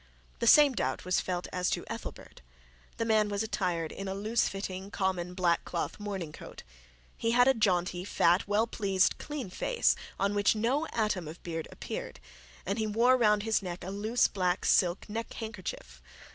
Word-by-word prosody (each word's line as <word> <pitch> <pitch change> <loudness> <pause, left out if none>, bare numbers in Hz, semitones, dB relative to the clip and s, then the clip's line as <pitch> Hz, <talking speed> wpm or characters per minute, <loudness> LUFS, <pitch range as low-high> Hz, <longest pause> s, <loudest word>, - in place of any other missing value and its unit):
The 235 - 0
same 290 +2 +8
doubt 130 - -2
was 185 0 +2
felt 180 -1 -3
as 180 0 0
to - - -2
Ethelbert. - - -8 0.6
The 230 - -1
man 215 -2 +3
was 205 +1 -1
attired 180 -7 -2
in 195 - -6
a 190 - -3
loose 220 +4 +1
fitting 195 0 -5
common 185 -3 -2
black 175 -2 +2
cloth 170 - -4
morning 195 -6 -4
coat. - - -11 0.5
He 230 0 0
had 245 +1 +5
a 265 - +6
jaunty 180 -4 0 0.4
well 210 +2 +2
pleased 195 -4 +1
clean 285 -10 -5
face, - - +1 0.2
on 200 +1 +1
which 205 +1 +3
no 260 +9 0
atom 210 -7 -1
of 160 +3 -10
beard 165 -2 -4
appeared, - - -6 0.5
and 200 +5 -2
he 220 - 0
wore 235 +4 +4
round 210 -4 +3
his 220 -1 +1
neck 180 -2 -6
a 185 - -5
loose 215 +5 +2
black 180 -2 -1
silk 180 0 +3
neckhandkerchief. 210 - -6
200 Hz, 175 wpm, -30 LUFS, 180-225 Hz, 0.6 s, same